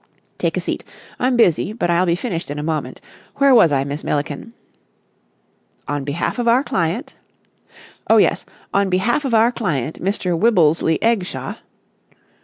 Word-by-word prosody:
"Take - - -1
a - - +1
seat. - - -4 0.4
I'm 250 0 +1
busy, 200 -2 +2
but 175 -7 -1
I'll 175 +2 +2
be 170 - +2
finished 180 - -4
in 145 - -5
a 150 - -4
moment. 155 -1 -3 0.3
Where 275 -1 +4
was 170 -10 +6
I, 135 -1 +1
Miss 145 +2 -5
Milliken?" 150 +9 -3 1.3
"'On 145 -1 -2
behalf 150 - -3
of 240 - -1
our 245 +3 +4
client....'" 175 - -2 1.0
"Oh, - - +6
yes. - - +3 0.3
On 200 -1 +2
behalf 220 +10 +1
of 245 -4 +1
our 225 +2 +4
client 160 - -3
Mr. 185 -2 -1
Wibblesley 165 -5 +3
Eggshaw.... 225 -5 -1
180 Hz, 155 wpm, -19 LUFS, 155-230 Hz, 1.3 s, was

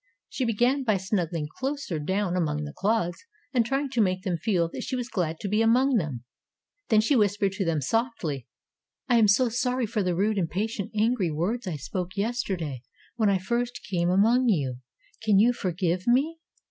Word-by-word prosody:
She 260 - -2
began 240 +5 +2
by 215 -5 +2
snuggling 180 -5 -2
closer 270 - -2
down 190 +4 -1
among 150 -4 0
the 150 0 -6
clods 195 -4 -1 0.3
and 245 -3 +4
trying 270 +3 -1
to 240 - +2
make 185 -2 +1
them 185 -4 0
feel 175 -2 +1
that - - -6
she - - -3
was 245 -2 -3
glad 165 -6 -2
to - - -3
be 210 +3 +1
among 245 +3 +4
them. 145 - -3 0.7
Then 215 -2 +5
she 250 +6 +2
whispered 205 -3 +2
to 195 0 -2
them 160 -3 0
softly: 165 - -2 0.6
"I 240 -3 +4
am 215 - +5
so 245 +6 +4
sorry 250 +1 0
for 215 0 -1
the 180 -2 0
rude, 205 +3 +1
impatient, 200 +4 -2
angry 215 -4 +2
words 190 +10 -2
I 175 - -2
spoke 180 +7 -5
yesterday 190 - -2 0.4
when 215 -3 +3
I 195 - +3
first 240 +5 -2
came 175 -2 +1
among 230 +7 +4
you. 135 - 0 0.4
Can 215 -3 +3
you 235 +5 +5
forgive 180 -2 -2
me?" 285 +7 +2
205 Hz, 185 wpm, -26 LUFS, 175-235 Hz, 0.7 s, Then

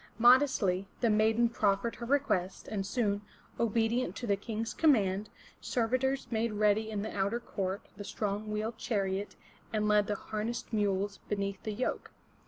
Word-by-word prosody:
Modestly 235 -6 +4
the 235 -3 +3
maiden 220 +2 +4
proffered 215 -1 0
her 235 - -6
request, 240 -10 0
and 195 -3 -3
soon, 205 -3 0 0.4
obedient 230 +2 +1
to - - -5
the 200 -3 +2
King's 220 +2 -4
command, 210 -10 +3 0.3
servitors 255 +3 0
made 225 0 0
ready 210 +1 +2
in 205 -2 -2
the 220 - -5
outer 200 +4 0
court 195 -4 -4
the 205 - -6
strong 210 +1 -3
wheeled 215 +2 -3
chariot, 200 -2 -1 0.4
and 210 -1 0
led 210 -1 +4
the 210 - 0
harnessed 220 +4 -4
mules 200 -1 0
beneath 200 -2 -2
the 215 - -3
yoke. 250 +5 -2
215 Hz, 155 wpm, -31 LUFS, 200-235 Hz, 0.4 s, Modestly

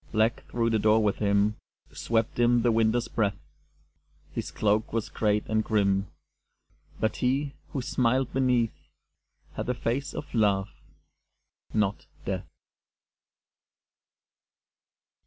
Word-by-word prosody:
_ - - -26
Black 110 +2 +2
through 115 -1 0
the 110 - +2
door 110 +1 +4
with 105 -2 +1
him 100 +1 +2 0.3
Swept 115 0 -1
in 120 0 +4
the 120 - +4
Winter's 115 +1 +2
breath; 100 -3 0 1.0
His - - -3
cloak 105 +1 +1
was 115 -1 -2
great 105 -1 +1
and 110 0 +1
grim 100 -2 +1 0.9
But 110 - 0
he, 135 +3 0 0.2
who 135 - -3
smiled 130 0 +1
beneath, 125 -4 +2 0.8
Had - - -4
the 125 - 0
face 125 +4 -2
of 145 - -6
Love 100 -4 +2 1.0
not 105 -2 0 0.2
Death. - - -3
110 Hz, 120 wpm, -27 LUFS, 105-120 Hz, 1.0 s, door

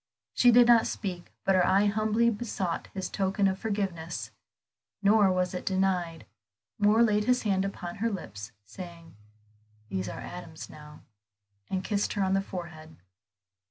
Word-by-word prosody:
She 245 - +5
did 240 +1 +7
not 235 -1 +5
speak, 180 -4 -5
but 195 - +4
her 185 -1 +4
eye 190 +3 +4
humbly 215 +3 +2
besought 205 -6 -3
this 190 -1 -2
token 195 0 +1
of 190 0 -1
forgiveness; 195 -6 -3 0.7
nor 200 -1 +5
was 185 0 0
it 180 - -4
denied. 185 -4 0 0.5
Moor 210 +3 +5
laid 210 -2 +2
his 250 +1 +2
hand 195 -3 +1
upon 180 -2 -6
her 230 +3 0
lips, 110 - -7
saying, 170 - -11 0.7
"these 95 0 -3
are - - -7
Adam's 165 -3 -8
now," 150 0 -13 0.7
and 185 0 -2
kissed 205 0 -1
her 200 - 0
on 190 0 +1
the 195 - +3
forehead. 170 -5 -8
190 Hz, 155 wpm, -28 LUFS, 175-210 Hz, 0.7 s, did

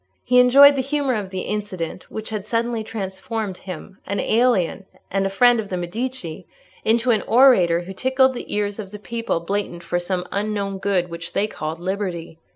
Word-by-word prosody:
He 250 0 +4
enjoyed 280 +3 +8
the 270 - +1
humour 275 0 0
of 205 -4 -3
the 190 -1 -4
incident, 185 -5 -4
which 220 0 -6
had 210 -3 -3
suddenly 230 0 -1
transformed 205 -1 -4
him, 185 +1 -9
an 200 - -1
alien, 215 -5 +1 0.2
and 195 0 +1
a - - -2
friend 240 +4 +4
of 210 -2 -4
the 185 - -2
Medici, 180 -2 -5 0.4
into 235 +2 +3
an 220 - +2
orator 220 -10 +5
who 185 +2 -8
tickled 260 +5 +2
the 245 - -7
ears 205 0 -1
of 200 -3 -6
the 210 - -8
people 230 -4 -3
blatant 175 -1 -3
for 175 +1 -1
some 180 0 -2
unknown 200 -1 -2
good 190 -3 0
which 170 0 -7
they 205 - +2
called 160 -5 -5
liberty. 180 -3 -4
205 Hz, 185 wpm, -22 LUFS, 185-235 Hz, 0.4 s, enjoyed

